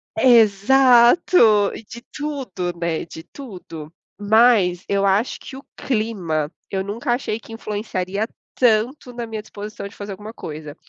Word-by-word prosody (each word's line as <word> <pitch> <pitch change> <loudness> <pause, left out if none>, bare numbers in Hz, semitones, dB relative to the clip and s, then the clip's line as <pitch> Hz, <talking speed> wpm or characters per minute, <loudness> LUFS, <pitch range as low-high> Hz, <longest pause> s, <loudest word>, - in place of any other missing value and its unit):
Exato. 235 - +5
E - - -9
de 235 +2 -11
tudo, 260 -12 -4
né, 170 -2 -2
de 160 0 -11
tudo. 175 - -10 0.3
Mas, 205 -4 +3
eu 200 0 +1
acho 200 +5 +1
que 265 - -10
o 270 - -10
clima 190 - -2 0.2
eu 190 -1 -1
nunca 230 +6 -2
achei 240 -3 -3
que 225 - -13
influenciaria 205 -2 -3 0.3
tanto 245 +2 +1
na 240 -1 -5
minha 220 -1 -5
disposição 210 -1 -8
de 200 - -15
fazer 205 0 -7
alguma 210 +3 -10
coisa. 150 -6 -8
215 Hz, 145 wpm, -21 LUFS, 190-240 Hz, 0.3 s, Exato